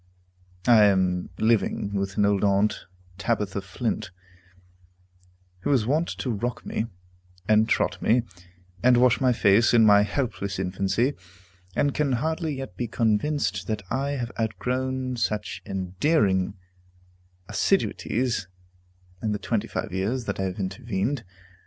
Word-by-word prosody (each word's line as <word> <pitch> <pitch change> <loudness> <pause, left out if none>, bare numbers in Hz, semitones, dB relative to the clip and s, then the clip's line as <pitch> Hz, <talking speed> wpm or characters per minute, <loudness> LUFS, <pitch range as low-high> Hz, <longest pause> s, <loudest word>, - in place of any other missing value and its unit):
I 115 -3 +7
am 95 -3 +2
living 110 -2 +1
with 100 0 -2
an 105 - +4
old 100 -1 +2
aunt, 100 +1 +2 0.3
Tabitha 105 -3 -1
Flint, 100 +2 -3 1.5
who - - -3
was 130 -6 +3
wont 155 +7 +1
to 125 - -2
rock 115 +3 -3
me, 110 - -2 0.6
and 110 +1 +4
trot - - +1
me, 120 +2 +3 0.6
and 125 0 +5
wash 125 +1 +4
my 130 -1 +4
face, 115 +1 +4
in 115 -1 +6
my 105 -1 +7
helpless 105 -4 -2
infancy, 95 +7 0 0.6
and 145 -1 +2
can 145 -3 +1
hardly 160 +4 -1
yet 135 -9 -7
be 120 +5 -3
convinced 110 -3 0
that 110 -2 -2
I 140 +3 0
have 120 -4 -3
outgrown 130 +4 -2
such 105 -2 -2
endearing 95 - +1 0.9
assiduities 120 -4 0 0.7
in 110 -1 0
the - - -1
twenty 110 0 -2
five - - -4
years 110 +7 -1
that 100 - -3
have 95 -1 -2
intervened. 95 +6 -2
110 Hz, 130 wpm, -25 LUFS, 100-125 Hz, 1.5 s, I